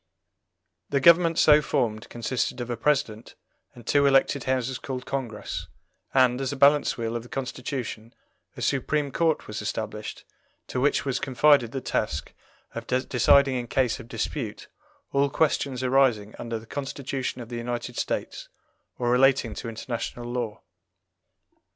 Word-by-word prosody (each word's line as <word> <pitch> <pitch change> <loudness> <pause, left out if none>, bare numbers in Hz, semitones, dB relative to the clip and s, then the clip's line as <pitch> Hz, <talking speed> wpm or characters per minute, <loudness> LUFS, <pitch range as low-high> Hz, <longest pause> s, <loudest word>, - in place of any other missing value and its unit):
The 140 - +2
government 170 +2 +6
so 150 0 +6
formed 120 -7 -1
consisted 120 +2 -2
of 120 0 -4
a - - -1
President 115 -3 -1 0.4
and 120 -2 -13
two 140 -1 +4
elected 135 -1 +3
Houses 130 0 -1
called 130 -2 -5
Congress, 105 -10 -4 0.4
and, 130 -1 +3
as 135 - -1
a - - -3
balance 140 +2 +4
wheel 115 -1 -3
of 120 - -2
the 120 - -14
Constitution, 125 -3 -5 0.4
a - - -4
Supreme 145 +1 0
Court 160 +2 +1
was 105 0 -5
established, 110 0 -5 0.4
to 125 - -2
which 145 +1 +2
was 135 -2 0
confided 135 -2 +4
the 135 - -4
task - - -2 0.4
of - - -6
deciding 130 +2 +3
in 120 -1 -4
case 125 -2 +1
of - - -10
dispute 115 -1 -4 0.4
all 140 0 +2
questions 140 -3 0
arising 125 -5 +2
under 115 -1 -3
the 110 - -11
Constitution 135 0 -4
of 120 -2 -8
the 120 - -5
United 120 +1 -4
States - - -3 0.5
or 120 -1 0
relating 130 -2 +3
to 115 - -6
international 120 +1 -5
law. 120 -3 -4
125 Hz, 150 wpm, -26 LUFS, 115-140 Hz, 0.5 s, government